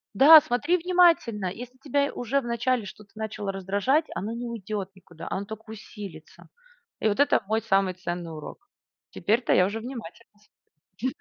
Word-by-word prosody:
Да, 305 +7 +10
смотри 300 +5 +1
внимательно, 335 - +3
если 245 +7 -6
тебя 280 +1 0
уже 255 +4 -1
вначале 235 -1 -1
что-то 200 +1 -12
начало 215 -2 -4
раздражать- 200 - +1
оно 210 +4 -3
не 240 +1 -5
уйдет 210 -4 -5
никуда, 175 -4 -12
оно 200 - -3
только 220 +1 -10
усилится. 200 -7 -11 0.5
И - - +1
вот 205 +2 0
это 285 - +3
мой 220 +2 +1
самый 195 -3 +1
ценный 175 -2 -5
урок. 155 -1 -10 0.4
Теперь-то 225 +6 +1
я 180 - +5
уже 205 +4 -3
внимательно 230 -3 -9 0.7
смотрю. 255 +6 -2
220 Hz, 155 wpm, -26 LUFS, 195-255 Hz, 0.7 s, Да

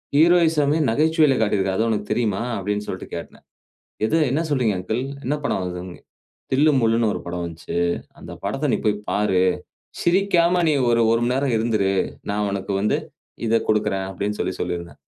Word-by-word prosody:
Heroism 160 -2 +4
ஏ - - 0
நகைச்சுவையில 155 +1 +3
காட்டியிருக்கிறாரு. 95 -3 +1
அது 115 - +2
உனக்கு 105 -2 -2
தெரியுமா?" 110 -3 0 0.2
அப்டின்னு 105 +1 -3
சொல்ட்டு - - -5
கேட்டேன். - - -9 0.6
"எது? 160 - +2
என்ன 150 +4 +1
சொல்றீங்க 125 -8 +1
அங்கிள்? 110 +6 -2 0.2
என்ன 140 +4 0
படம் 145 - 0
வந்தது?" 90 0 -6 0.5
"தில்லு 150 +4 +4
முல்லுனு 115 0 +2
ஒரு - - -5
படம் 85 0 -3
வந்ச்சு. 85 0 -6 0.4
அந்த - - -10
படத்த 135 +7 -1
நீ - - +1
போய் 105 - +2
பாரு. 95 -3 +2 0.6
சிரிக்காம 175 -1 +3
நீ - - +3 0.2
ஒரு 115 0 +3
1 115 0 +3
மண் 125 - +1
நேரம் 135 -2 +1
இருந்திரு. 110 -4 +1 0.4
நான் 105 0 0
உனக்கு 100 0 -3
வந்து 105 - +1 0.5
இத 115 - +4
குடுக்குறன்" 105 -3 0
அப்டின் 100 +2 -3
சொல்லி 95 - -1
சொல்லியிருந்தேன். 85 -1 -4
110 Hz, 165 wpm, -22 LUFS, 100-140 Hz, 0.6 s, Heroism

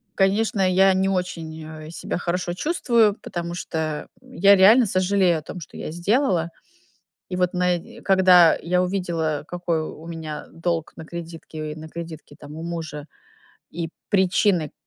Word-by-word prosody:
конечно, 200 +1 +2
я 190 +1 +5
не 190 +1 +1
очень, 170 -4 -3
э, 155 0 -9
себя - - -4
хорошо 175 0 -2
чувствую, 235 - +2
потому 170 0 -5
что 155 -3 -3
я 200 -6 +4
реально 220 +6 +7
сожалею 185 -3 +2
о - - -11
том, 180 - -8
что 165 - -11
я - - -5
сделала. 175 - +1 0.8
И 180 - -3
вот 180 -1 +1
на 180 0 +2
и 170 - -13
когда 185 -3 +6
я 180 +2 +1
увидела, 170 -5 -2
какой 175 -2 -2
у 160 +1 -9
меня 160 -2 -6
долг 165 -1 -2
на 160 - -9
кредитке 165 -2 -7
и - - -12
на 155 0 -9
кредитке, 165 -3 -9
там, 150 - -10
у 160 - -7
мужа, 160 -4 -5 0.7
и 165 -1 -4 0.2
причины 185 -4 +2
175 Hz, 155 wpm, -23 LUFS, 160-190 Hz, 0.8 s, реально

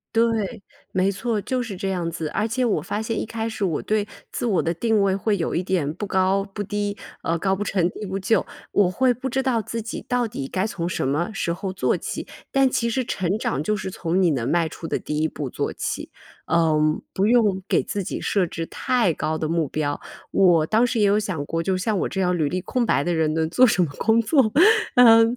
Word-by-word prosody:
对， 225 -4 +1 0.3
没 190 +1 +2
错， 220 +3 -2
就 255 +4 -2
是 215 -6 -5
这 195 +1 -2
样 175 -3 -1
子。 160 -2 -4
而 215 +6 -1
且 250 +3 0
我 225 - +1
发 205 - -3
现 220 0 -2
一 - - -3
开 225 0 -3
始 220 -2 -4
我 170 -6 0
对 215 -1 0 0.2
自 - - -4
我 195 -5 +2
的 165 - -1
定 220 +4 +1
位 195 -1 +2
会 200 +1 0
有 165 - -2
一 175 - +1
点 175 -6 -1
不 205 +3 -5
高 190 +1 +2
不 205 - -3
低， 205 +1 -2 0.2
呃， 165 +1 0
高 190 +3 +1
不 205 - -3
成 185 -4 +1
低 210 - -7
不 190 +1 -3
就。 195 +1 +2 0.3
我 200 -3 +3
会 250 +7 +2
不 260 +3 -4
知 265 +1 0
道 240 -4 +1
自 230 +2 -4
己 230 - -6
到 245 -1 +1
底 135 -10 -5
该 190 +1 0
从 175 -5 -3
什 150 - -1
么 150 +5 0
时 170 -3 -1
候 190 +2 -4
做 190 - +1
起。 - - -5 0.2
但 270 -1 +4
其 235 -1 0
实 260 +2 0
成 190 0 -1
长 145 - -1
就 210 +7 0
是 190 -1 -5
从 180 0 -1
你 175 -3 +4
能 125 -2 -1
迈 165 0 +2
出 165 - -8
的 - - 0
第 150 0 -3
一 160 - +2
步 145 -3 -5
做 - - -2
起， - - -4 0.4
嗯， 155 -2 +3
不 195 +2 +2
用 215 -5 +3
给 - - +2
自 200 - -3
己 - - -4
设 190 -4 +1
置 165 0 -4
太 235 -1 +1
高 155 +1 -2
的 155 - -2
目 165 -2 0
标。 145 -1 -2 0.3
我 175 -5 +4
当 220 +8 +3
时 235 -2 -1
也 205 - +4
有 205 +1 +4
想 175 -9 -3
过， 165 +2 -2
就 190 +2 0
像 205 +2 0
我 - - -1
这 190 - -4
样 180 -1 +2
履 150 -4 0
历 185 0 -2
空 245 +6 -1
白 - - +2
的 175 - 0
人 160 -2 +1
能 160 0 +1
做 255 +8 +5
什 185 -4 +3
么 150 - -3
工 225 +1 +3
作？ 240 -1 +3 0.4
呃， 230 -2 +8
195 Hz, 265 characters per minute, -23 LUFS, 170-220 Hz, 0.4 s, 呃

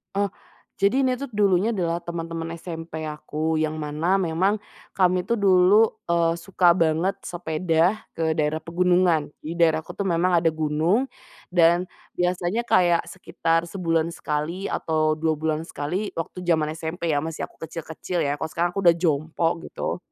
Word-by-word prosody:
Oh, 200 -1 +1 0.5
jadi 205 +8 +3
ini 255 -1 +1
tuh 280 - -4
dulunya 205 +2 +2
adalah 170 -3 0
teman-teman 165 -1 -5
SMP 165 -1 -7
aku 155 +1 -2
yang 155 0 -1
mana 155 +5 0
memang 185 +5 +1 0.3
kami 180 -1 +2
tuh 235 - 0
dulu, 195 +3 +5 0.2
eee, 170 0 +2
suka 175 0 +3
banget 165 +4 +1
sepeda 170 +3 +1 0.2
ke 160 0 -1
daerah 155 +1 0
pegunungan. 175 -2 +2 0.2
Di 165 +3 -6
daerahku 160 -2 +1
tuh 200 - -2
memang 175 0 +2
ada 165 0 +2
gunung, 160 - +1 0.4
dan 175 +1 +3 0.2
biasanya 180 +4 0
kayak 175 -7 +3
sekitar 165 -2 -1
sebulan 165 -2 -1
sekali 165 +6 -3
atau 155 -1 0
2 160 0 +1
bulan 155 +1 -2
sekali 175 +8 -3
waktu 180 +2 -5
jaman 160 -3 +2
SMP 165 +1 -3
ya, 145 -2 +2
masih 165 -1 -5
aku - - -26
kecil-kecil 165 +2 -5
ya 145 0 0
kalau 150 - -3
sekarang 175 +1 +1
aku 195 0 -3
udah 170 - +8
jompo, 165 0 0
gitu. - - -4
170 Hz, 155 wpm, -24 LUFS, 160-180 Hz, 0.5 s, udah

